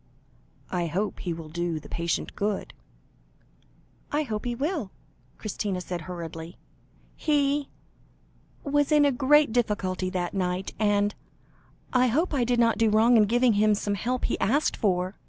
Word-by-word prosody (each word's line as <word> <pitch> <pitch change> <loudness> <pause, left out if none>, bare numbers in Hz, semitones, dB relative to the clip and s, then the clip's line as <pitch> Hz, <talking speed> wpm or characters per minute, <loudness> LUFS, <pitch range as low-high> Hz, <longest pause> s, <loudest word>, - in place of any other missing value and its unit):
"I 175 -2 0
hope 195 +6 -2
he 175 - -3
will 165 -1 -6
do 170 0 -2
the - - -13
patient 170 0 -2
good." 205 0 -2 1.4
"I 295 +1 +1
hope 215 -5 -4
he 240 -1 -1
will," 285 - -2 0.5
Christina 205 -3 -3
said 175 -1 -5
hurriedly; 165 0 -7 0.6
"he 290 -2 +1 0.9
was 290 0 +1
in 300 -1 +5
a 285 - +4
great 285 +1 +4
difficulty 200 -6 0
that 180 -2 -3
night, 185 -1 -2
and 205 -1 +2 0.8
I 255 0 +4
hope 310 +9 +1
I 265 -4 +2
did 240 0 +1
not 230 -1 +3
do 225 -1 +4
wrong 225 +3 +5
in 215 -2 +6
giving 240 +2 +3
him 210 +1 +3
some 205 0 -2
help 245 +5 -1
he - - -1
asked 280 +8 +1
for?" 185 -1 0
215 Hz, 155 wpm, -26 LUFS, 185-255 Hz, 1.4 s, in